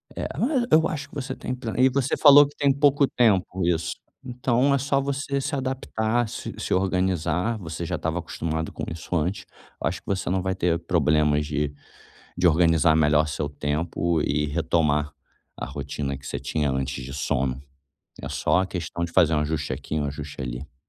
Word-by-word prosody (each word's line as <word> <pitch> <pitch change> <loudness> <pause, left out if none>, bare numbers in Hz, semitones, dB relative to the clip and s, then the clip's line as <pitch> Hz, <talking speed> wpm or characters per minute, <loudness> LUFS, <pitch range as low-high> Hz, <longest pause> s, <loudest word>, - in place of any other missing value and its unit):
É, - - -3
mas 255 -1 +1
eu 160 +1 +5
acho 150 -2 -5
que - - -16
você 135 -1 -4
tem 125 - -4
ple 120 -3 -5
e 130 +1 +5
você 135 0 0
falou 145 -1 +9
que 145 - -16
tem 140 -2 +3
pouco 140 0 +3
tempo 95 -6 +2
isso, 85 -1 0 0.3
então 125 +2 +1
é - - +4
só 135 +1 +1
você 140 0 -2
se 140 +2 -2
adaptar, 120 -3 -1
se - - -6
se - - -2
organizar, 95 +2 0
você 85 -2 -6
já - - -2
estava - - -2
acostumado 80 0 -3
com - - -6
isso 85 +2 -5
antes. 90 +5 -1 0.4
Eu - - +1
acho 85 +1 -3
que - - -45
você 95 -2 -1
não 95 0 +1
vai 95 0 -1
ter 85 -1 +1
problemas 75 -3 +2
de 75 -1 -2 0.6
de 90 0 +4
organizar 80 -1 +4
melhor 75 0 +3
seu 75 0 -3
tempo 80 +3 -1
e 75 +1 0
retomar 75 -1 +1 0.5
a - - -4
rotina 70 +1 -4
que 70 - -15
você - - -4
tinha 75 -2 -1
antes 65 0 -3
de 70 +2 -7
sono. 65 -1 -1 0.6
É - - -5
só 95 - +2
questão 85 -2 -4
de 85 - -3
fazer 80 -4 +4
um - - +2
ajuste 75 -2 -2
aqui, 75 +3 -4
um 75 - -1
ajuste 70 0 -6
ali. 65 +2 -6
85 Hz, 195 wpm, -25 LUFS, 75-120 Hz, 0.6 s, falou